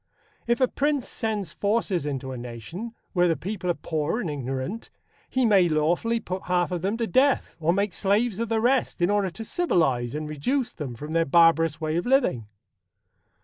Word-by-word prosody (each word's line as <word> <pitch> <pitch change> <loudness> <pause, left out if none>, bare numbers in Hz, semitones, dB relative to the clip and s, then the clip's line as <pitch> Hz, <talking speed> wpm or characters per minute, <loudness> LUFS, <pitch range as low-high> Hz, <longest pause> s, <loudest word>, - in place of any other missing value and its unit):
If 235 +2 +2
a 255 - +4
prince 285 0 0
sends 210 -7 -3
forces 200 -6 0
into 135 -2 -4
a - - -5
nation, 125 - -7 0.2
where 175 -2 +3
the 165 - +2
people 190 -1 -4
are 175 - +2
poor 160 +7 -2
and 170 -10 -2
ignorant, 135 - -4 0.4
he 260 -1 +1
may 195 -6 +5
lawfully 170 +10 +1
put 185 -3 -5
half 180 0 +1
of 175 -2 -2
them 200 +5 -1
to 230 - 0
death 265 +4 +2
or 165 +1 +2
make 200 +1 0
slaves 205 +2 +1
of 230 -1 -2
the 225 -1 +1
rest, 250 0 +1
in 175 +3 +2
order 205 -2 +1
to 225 +6 -8
civilize 155 - +1
and 155 0 -3
reduce 235 - -1
them 135 -6 -6
from 150 +6 -7
their 165 0 +3
barbarous 165 0 +4
way 155 0 -1
of 175 - -2
living. 245 - +2
180 Hz, 190 wpm, -25 LUFS, 155-225 Hz, 0.4 s, may